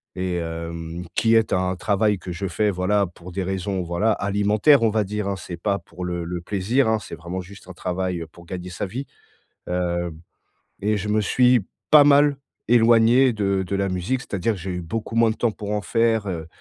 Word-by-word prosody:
Et 90 -1 -2
hem, 85 +1 -5
qui 115 0 +3
est 110 -1 +3
un 90 0 +1
travail 100 +2 +1
que 90 - -8
je 95 +3 -3
fais, 105 +4 +1
voilà, 100 +2 +1
pour 85 +1 -12
des 95 +1 -2
raisons, 95 0 -2
voilà, 85 +6 +1
alimentaires, 105 +7 +3
on 115 - +4
va 110 0 +1
dire, 105 +1 -3
hein. 100 - -1
C'est 90 -2 -7
pas 100 +3 -1
pour 85 +1 -10
le 85 -1 -3
le 90 0 -4
plaisir, 105 +8 0
hein. 110 - +3
C'est - - -10
vraiment 85 +3 -5
juste 95 +1 -13
un - - -7
travail, 90 -1 -3
heu, 80 - -6
pour 85 +1 -16
gagner 90 -1 -6
sa 95 +3 -4
vie. 130 +8 -5 0.6
Heu 85 -1 -1 0.7
et 105 +1 +1
je 105 +1 -4
me 105 +1 +2
suis 125 +1 +3 0.3
pas 150 -1 +9
mal 145 0 +5 0.3
éloigné 120 +2 +5
de 100 -3 0
de 100 +2 -2
la 100 0 0
musique, 90 +8 -1
c'est-à-dire 105 +2 -1
que - - -8
j'ai 95 +1 -4
eu 90 - -3
beaucoup 110 +6 -5
moins 115 -1 +4
de 110 - -3
temps 115 -3 +1
pour 105 0 -7
en 105 -1 -1
faire, 115 +1 +1
heu 85 -4 -4
100 Hz, 215 wpm, -23 LUFS, 90-110 Hz, 0.7 s, pas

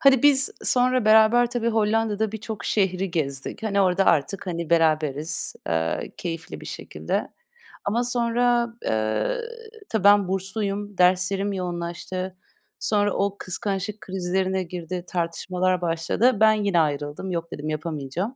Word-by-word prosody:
hadi 270 -3 +5
biz 275 -2 +5
sonra 255 -1 +2
beraber 220 +3 +5
tabii, 235 -1 0
Hollanda'da 220 -1 +1
birçok 220 0 -6
şehri 190 -2 0
gezdik. 140 - -3
Hani, 200 -2 +1
orada 190 0 +3
artık, 190 +6 +1
hani, 170 -2 -4
beraberiz, 155 -2 +1
eee, 80 0 -1
keyifli 165 -1 -6
bir - - -10
şekilde - - -4 0.6
ama 230 +4 +1
sonra, 240 0 +1
eee, 110 - 0 0.5
tabii, 220 -4 -1
ben 205 -1 +6
bursluyum, 200 +1 -3
derslerim 185 +2 +2
yoğunlaştı. 180 +1 -4 0.4
Sonra 205 -1 +1
o 200 0 -1
kıskançlık 200 +2 -3
krizlerine 190 0 -1
girdi, 175 0 -5
tartışmalar 180 +1 -1
başladı. 175 +8 +1
Ben 220 0 +6
yine 205 -4 +1
ayrıldım. 145 +4 -1
Yok 170 -1 -3
dedim, 150 +1 -5
yapamayacağım. 155 0 -4
190 Hz, 125 wpm, -24 LUFS, 170-215 Hz, 0.6 s, ben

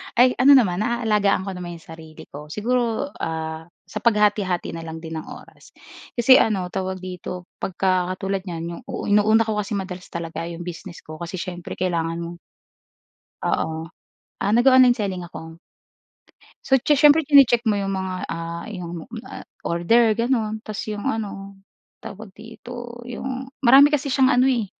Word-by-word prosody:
ay 250 +2 +6
ano 275 +2 +8
naman, 190 -8 +3
naaalagaan 215 -4 +1
ko 195 - -4
naman 175 -2 -7
'yong 165 0 -14
sarili 160 -1 -11
ko. 150 +1 -9
Siguro, 235 - -1
ah, 160 0 -4 0.2
sa 215 - -6
paghati-hati 210 -5 +1
na 165 - -6
lang 160 +1 -8
din 160 -1 -5
ng - - -10
oras. - - -13 0.4
Kasi 250 +2 +7
ano, 185 -5 0
tawag 190 -1 -4
dito? 180 0 -7
Pagka 185 -1 0
katulad 195 0 -3
niyan, 165 -2 -5 0.2
'yong - - -4
inuuna 215 +2 +5
ko 215 -1 -2
kasi 210 +1 -3
madalas 185 -2 -5
talaga 165 0 -5
'yong 170 0 -7
business 175 0 -9
ko 155 0 -10
kasi 170 +2 -6
syempre 175 -1 -6
kailangan 165 -2 -1
mo. 170 +1 -8 1.1
Oo. 160 0 -1 0.5
Ah, 205 - 0
nag-o-online 255 +1 +6
selling 195 -5 -3
ako. 165 -1 -10 1.1
So, 265 -1 +4
siye 295 - +3
siyempre 295 +2 +6
chini-check 275 -5 +6
mo 210 -2 +2
'yong 195 0 -2
mga, 190 -1 -3 0.2
ah, 165 0 -5
'yong, 175 -4 -6 0.2
ah, - - -9 0.2
order, 220 +7 +3
gano'n. 225 -3 -1
Tapos 215 -1 -5
'yong 210 -1 -5
ano, 195 -2 -4 0.4
tawag 205 -1 -9
dito? 240 +2 -10
'Yong 260 +2 -6
marami 275 +3 +7
kasi 285 -1 0
siyang 260 0 +3
ano, 250 +1 +4
eh, 240 -5 +1
200 Hz, 160 wpm, -22 LUFS, 175-235 Hz, 1.1 s, ano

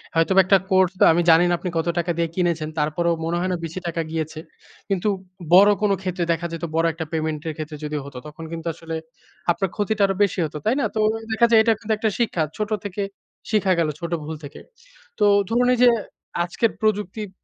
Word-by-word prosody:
হয়তোবা 185 +4 +5
একটা 195 +1 +6
কোর্স 190 -2 +4
তা - - +7
আমি 170 - +2
জানি 165 +1 +7
না - - +2
আপনি 180 - -3
কত 165 - -1
টাকা 175 +1 0
দিয়ে 170 0 +1
কিনেছেন। 170 -4 0
তারপরও 160 +3 +1
মনে 170 +1 -1
হয় 185 +1 -1
না - - +1
বেশি 165 +3 -5
টাকা 165 0 -2
গিয়েছে। 160 -1 -3 0.5
কিন্তু 195 0 0 0.5
বড় 200 +3 +8
কোন 210 -1 +2
ক্ষেত্রে 185 -1 -2
দেখা 165 +1 -1
যেত 165 - -6
বড় 165 0 +2
একটা 160 0 -5
পেমেন্ট 155 -1 -2
এর 160 - -2
ক্ষেত্রে 155 -1 -6
যদি 150 0 -3
হতো 140 -2 -9
তখন 150 +2 -10
কিন্তু 165 0 -5
আসলে 165 0 -7 0.6
আপনার 190 +2 -1
ক্ষতিটা 210 0 -1
আরো 195 - -1
বেশি 200 -1 0
হত। 155 - -8
তাই 225 - +3
না? - - +1
তো - - 0 0.3
দেখা 220 +2 +4
যায় 230 -1 +6
এটা 225 0 +4
কিন্তু 220 -1 -1
একটা 220 +1 +1
শিক্ষা। 210 -8 +1
ছোট 210 0 -2
থেকে 205 0 -4 0.5
শিখা 205 -3 +2
গেল 165 - +2
ছোট 170 0 -5
ভুল 155 +2 -5
থেকে। 145 0 -9 0.6
তো 210 - +4 0.2
ধরুন 245 +2 +2
এই - - +1
যে, 245 - +8 0.5
আজকের 195 +6 0
প্রযুক্তির 210 -1 -1
175 Hz, 215 wpm, -22 LUFS, 165-205 Hz, 0.6 s, বড়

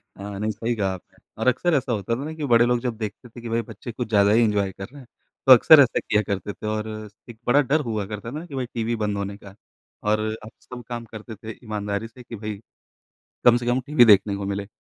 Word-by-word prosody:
हाँ, 100 0 -7
नहीं 110 +1 -1
सही 115 +3 -2
कहा 100 -3 0
आपने। 90 - -13 0.2
और - - 0
अक्सर 145 +7 +2
ऐसा 130 -2 0
होता 105 +2 -1
था 135 - -5
ना 155 - -5
कि 155 -2 -4
बड़े 120 -3 +5
लोग 120 0 +2
जब 120 -3 -3
देखते 110 +2 -6
थे 120 +1 -12
कि 115 - -6
भई 115 +1 +1
बच्चे 115 +1 -9
कुछ 115 0 -5
ज़्यादा 100 -2 +4
ही 115 +2 +5
एन्जॉय 100 -3 +1
कर 95 +1 -8
रहे 140 0 -12
हैं 125 - -16 0.4
तो - - +8
अक्सर 150 +5 +8
ऐसा 125 - +3
किया 105 - +1
करते 100 +1 -3
थे 105 - -7
और 110 0 -2 0.2
स 100 - -34
एक 115 -2 -11
बड़ा 140 +4 +5
डर 155 - +4
हुआ 105 -3 -2
करता 105 +3 -6
था 155 +4 -6
कि 145 -6 -9
भई 130 - -2
टीवी 115 0 -1
बंद 105 -1 -1
होने 100 0 -4
का 100 -1 -14 0.5
और 105 0 +3 0.2
अब 110 - -9
सब 125 -1 -10
काम 120 -1 -5
करते 110 +1 -9
थे 110 +2 -8
ईमानदारी 105 -1 -3
से 120 +2 -15
कि 115 - -9
भई 105 -1 -5 0.9
कम 120 -1 +7
से 120 - -5
कम 120 +1 +2
टीवी 145 -5 +6
देखने 100 -1 +5
को 100 0 -4
मिले। 100 0 -3
110 Hz, 260 wpm, -24 LUFS, 105-120 Hz, 0.9 s, तो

